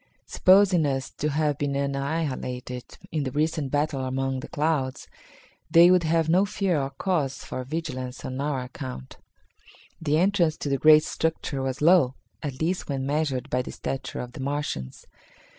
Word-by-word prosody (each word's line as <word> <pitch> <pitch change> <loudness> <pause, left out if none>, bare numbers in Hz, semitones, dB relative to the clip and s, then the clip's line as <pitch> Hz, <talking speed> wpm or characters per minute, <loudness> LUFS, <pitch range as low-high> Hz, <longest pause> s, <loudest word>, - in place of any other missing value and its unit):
Supposing 185 -4 +4
us 135 -1 -2
to 150 - -2
have 150 -1 0
been 145 -1 -1
annihilated 140 -3 -3 0.3
in 155 -2 -1
the 135 - -2
recent 150 0 0
battle 145 -1 0
among 135 0 -1
the - - -7
clouds, 145 -4 -1 0.6
they 170 +2 +7
would 180 -1 +5
have 165 0 +1
no 180 +4 +4
fear 195 -6 0
or 135 - -2
cause 140 -3 -2
for 130 - -5
vigilance 130 -3 -5
on 130 +1 -4
our 145 -2 -1
account. 125 - -8 0.8
The 150 -1 +1
entrance 175 -3 +2
to 145 - -4
the 135 -1 0
great 155 0 +7
structure 160 -4 -2
was 135 +2 -3
low 160 -6 +5 0.3
at 140 -4 -5
least, 175 +2 -1
when 135 -1 -2
measured 145 -3 -1
by 125 - +2
the - - -7
stature 130 -1 -4
of 125 - -7
the 140 - -11
Martians. 135 - -4
145 Hz, 165 wpm, -26 LUFS, 130-160 Hz, 0.8 s, they